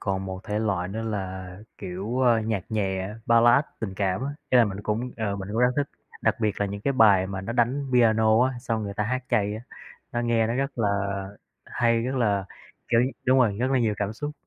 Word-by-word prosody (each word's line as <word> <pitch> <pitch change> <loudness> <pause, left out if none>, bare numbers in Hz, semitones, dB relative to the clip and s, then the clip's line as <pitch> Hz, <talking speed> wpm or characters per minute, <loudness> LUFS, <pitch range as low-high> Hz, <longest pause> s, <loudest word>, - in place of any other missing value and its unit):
còn 95 -1 -2
một 95 -1 -5
thể 105 -1 -2
loại 95 -5 -1
nữa 110 +4 -4
là, 95 -4 -4 0.3
kiểu, 100 +6 -4
ơ, 120 -3 +4
nhạc 110 -4 -2
nhẹ, 95 -3 -1 0.2
Ballad, 120 +4 +5 0.2
tình 95 -4 -4
cảm 95 +3 -1
á, 140 - -2 0.2
ý 125 - +6
là 120 - +7
mình 100 -1 -4
cũng 110 +4 -2
ờ, 105 -3 -2
mình 95 0 -6
cũng 110 - -2
rất 125 0 +5
thích, 145 0 0 0.3
đặc - - +1
biệt 105 -2 -1
là 100 - +2
những 100 +1 -5
cái 140 +6 0
bài 100 -6 +5
mà 95 -1 -4
nó 100 +5 -4
đánh 125 +4 +1
piano 110 -1 +4
á, 130 - 0
xong 115 -3 -2
người 100 -1 -5
ta 105 - -1
hát 130 +2 -2
chay 105 0 +1
á, 110 - -6 0.5
nó 120 - -1
nghe 115 -2 +2
nó 115 - -1
rất 135 +1 -2
là 110 -3 +1 0.8
hay, 115 -1 +1
rất 130 +2 -2
là 100 -6 +1 0.4
kiểu 115 - +3 0.3
đúng 130 +1 +4
rồi, 110 -6 +2
rất 130 +2 +1
là 130 - +3
nhiều 110 -3 +1
cảm 105 +1 -2
xúc. 145 +6 -5
110 Hz, 230 wpm, -25 LUFS, 100-120 Hz, 0.8 s, là